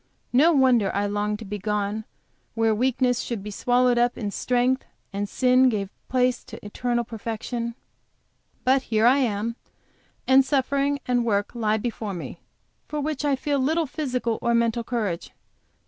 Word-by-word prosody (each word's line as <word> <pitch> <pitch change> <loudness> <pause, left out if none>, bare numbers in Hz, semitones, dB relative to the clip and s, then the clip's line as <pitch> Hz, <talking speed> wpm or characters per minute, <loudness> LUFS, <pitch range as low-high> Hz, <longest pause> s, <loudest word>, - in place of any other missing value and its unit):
No 300 +7 +6
wonder 255 - +4
I 200 +1 +1
longed 205 +1 -1
to 220 - -9
be 205 +1 -5
gone 210 +1 -2 0.5
where 225 -1 +2
weakness 250 +1 +1
should 230 -6 -4
be 210 - -6
swallowed 245 +3 +2
up 240 0 +2
in 205 -2 -3
strength, 250 +4 +1 0.3
and 200 0 -2
sin 255 0 +4
give 200 -4 -2 0.2
place 250 -1 +1
to - - -11
eternal 240 +3 -1
perfection! 230 +1 -4 0.9
But 265 +1 +4
here 220 0 +3
I 260 +4 +6
am, 230 -1 -1 0.7
and 265 +1 +6
suffering 280 +1 +1
and 245 -1 +2
work 205 -3 0
lie 220 -2 +1
before 220 -3 -4
me, 170 - -7 0.5
for 300 - -3
which 295 -1 -2
I 285 -2 +2
feel 285 +1 -1
little 315 +5 +1
physical 255 -6 -2
or 235 0 +2
mental 235 0 +1
courage. 215 -8 -3
240 Hz, 160 wpm, -25 LUFS, 215-260 Hz, 0.9 s, No